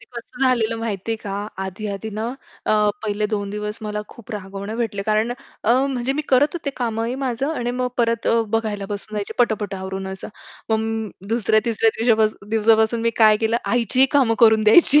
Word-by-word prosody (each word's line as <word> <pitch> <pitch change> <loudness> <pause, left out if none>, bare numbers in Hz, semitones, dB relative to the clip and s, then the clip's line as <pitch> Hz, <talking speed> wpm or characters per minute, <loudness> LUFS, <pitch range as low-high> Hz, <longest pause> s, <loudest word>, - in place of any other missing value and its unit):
ते - - -15
कसं 240 +2 -7
झालेलं 230 -3 +2
माहितीये 225 0 -3
का? 205 -2 -7 0.3
आधी-आधी 200 +2 -4
ना 215 +2 -3 0.4
अ, - - +3 0.3
पहिले 210 0 0
2 205 -2 -3
दिवस 210 +1 -4
मला 210 0 -3
खूप 235 - -14
रागवणं 200 +1 -6
भेटलं. 220 -4 -2
कारण 215 +2 +1 0.3
अ, 225 - +3 0.2
म्हणजे 260 -1 -1
मी 300 +2 -2
करत 280 +3 +4
होते 315 -5 -3
कामही 230 0 -2
माझं 265 +4 -1
आणि 245 -5 -2
मग 250 0 -1
परत 230 -1 +1
अ, 230 - +4
बघायला 215 -2 -1
बसून 205 +1 -5
जायचे, 205 -1 -3
पटापट 215 -4 +1
आवरून 190 0 -5
असं. 190 0 -6 0.4
मग 220 -1 -1 0.2
दुसऱ्या 220 -1 +2
तिसऱ्या 225 -1 +2
दिवसापासून 220 -3 +2
दिवसापासून 220 +1 +3
मी 230 - +2
काय 215 -2 +6
केलं, 225 +2 +1
आईचीही 245 +2 +3
कामं 255 -6 +4
करून 220 -2 +6
द्यायची. 290 +6 +7
220 Hz, 180 wpm, -21 LUFS, 210-235 Hz, 0.4 s, द्यायची